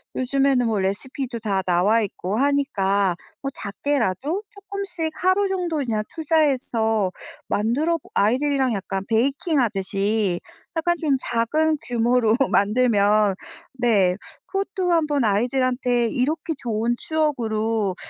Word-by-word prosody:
요즘에는 265 -1 +2
뭐 220 -3 0
레시피도 235 +6 -3
다 200 -4 -1
나와 185 +6 +3
있고 200 0 -3
하니까 200 - +1 0.3
뭐 275 - -2
작게라도 275 - -1
쪼끔씩 395 -5 -5
하루 375 +2 +2
정도 360 -4 -2
그냥 230 -7 -1
투자해서 250 - +1 0.4
만들어 285 +11 +1
보 - - -20
아이들이랑 260 +3 +2
약간 195 -1 -3
베이킹하듯이 220 - 0 0.4
약간 345 +1 +1
좀 290 -5 +2
작은 300 +8 +1
규모로 235 -1 +2 0.2
만들면 210 -2 +3 0.5
네 200 -7 +3 0.3
그것도 390 -2 -2
한번 300 -5 +2
'아이들한테 245 +2 +1
이렇게 305 +5 -1
좋은 230 -2 -1
추억으로 225 - 0
245 Hz, 275 characters per minute, -23 LUFS, 210-300 Hz, 0.5 s, 나와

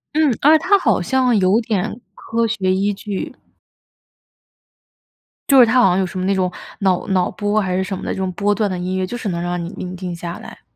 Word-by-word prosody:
嗯， 300 -6 +2
而 310 +2 +6
且 - - -10
它 400 +2 +5
好 235 - +1
像 250 +4 +2
有 195 +4 +3
点 220 +1 -2 0.2
科 230 0 -2
学 190 -4 0
依 200 +2 0
据。 200 -1 -5 2.2
就 270 -1 +7
是 245 - +9
他 245 +3 +3
好 240 - +5
像 180 - +1
有 190 - +1
什 185 - -7
么 185 - -2
那 195 - +2
种 185 -1 0 0.3
脑 190 -3 +1
脑 185 -2 +1
波 205 +1 0
还 185 -3 -1
是 190 - 0
什 190 0 -4
么 - - -9
的 - - -3
这 - - -4
种 190 -1 -2
波 205 +3 +1
段 210 -2 0
的 185 - -3
音 185 +1 -3
乐， 185 - 0
就 240 +6 -5
是 220 -5 -4
能 170 -1 -3
让 175 0 -3
你 170 - -5
宁 180 0 -6
静 180 -1 -5
下 170 0 -6
来。 - - -12
195 Hz, 255 characters per minute, -19 LUFS, 185-225 Hz, 2.2 s, 是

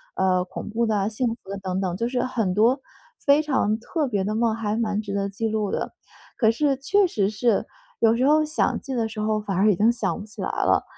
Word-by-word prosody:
呃， 185 -1 +2
恐 180 - -7
怖 230 +2 0
的 220 - 0
啊， 195 0 0
幸 220 +4 -2
福 225 -4 -6
的 200 - -4
等 190 -1 -3
等， 185 -2 -1
就 230 - -2
是 250 -1 0
很 220 -7 -1
多 240 +7 +3 0.4
非 285 +1 +5
常 265 -8 0
特 295 +6 -2
别 200 -4 0
的 210 +1 -1
梦， 225 0 +2
还 215 -2 -2
蛮 215 -2 0
值 200 -2 -6
得 200 0 -1
记 210 +3 -2
录 215 -2 -1
的。 - - -3 0.4
可 220 -2 +4
是 280 +4 +1
确 375 +9 +2
实 200 - 0
是， 215 +1 +1 0.3
有 230 0 +4
时 260 +3 +2
候 310 +1 +5
想 310 +2 0
记 270 - -6
的 230 -2 0
时 215 -1 -6
候 215 0 +1
反 200 -3 -3
而 205 +3 +4
已 - - +1
经 220 +3 +4
想 240 -1 -1
不 205 - -7
起 215 - -10
来 - - -2
了， - - +2
220 Hz, 270 characters per minute, -24 LUFS, 200-245 Hz, 0.4 s, 非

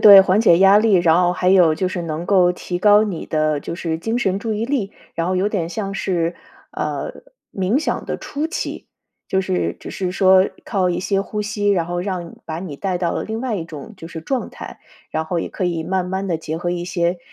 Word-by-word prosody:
对， 200 -2 +11
缓 190 +2 +3
解 170 -6 +5
压 195 +1 +7
力， 215 -1 +4
然 175 -2 +4
后 175 0 +3
还 180 0 0
有 180 -5 +5
就 185 - -1
是 175 -1 -4
能 165 +1 -4
够 185 -3 +4
提 180 0 -4
高 210 +1 +6
你 185 -6 -4
的 155 -2 0
就 170 - -5
是 165 -3 -2
精 225 +8 -2
神 195 -4 0
注 220 +1 -3
意 215 +2 -1
力， 235 -7 -1 0.2
然 165 +1 -1
后 185 - 0
有 195 +3 +2
点 175 -6 -2
像 195 +1 -4
是， 170 -3 -1 0.4
呃， - - -4 0.3
冥 195 +7 +1
想 315 - -2
的 - - -3
初 295 +3 -3
期， 345 - -4 0.4
就 190 - +2
是 185 -1 -1
只 - - -9
是 185 -2 -3
说 190 0 +5 0.2
靠 185 -4 +1
一 - - -1
些 195 +1 0
呼 210 +1 -4
吸， 205 -1 -1
然 170 -4 +1
后 175 0 -2
让 180 -3 -4
把 160 0 -5
你 175 -5 -6
带 185 0 -2
到 170 -2 0
了 - - -2
另 220 +1 -4
外 255 -4 -2
一 165 - -4
种 165 +7 -9
就 165 -2 -9
是 165 -2 -7
状 260 - -2
态。 - - -10 0.3
然 160 0 -1
后 170 +1 -2
也 - - -3
可 185 - -3
以 165 -2 -1
慢 185 0 -1
慢 190 +1 -2
地 170 -3 0
结 160 0 -5
合 175 0 -2
一 175 0 -2
些 175 0 0
185 Hz, 255 characters per minute, -20 LUFS, 170-200 Hz, 0.4 s, 对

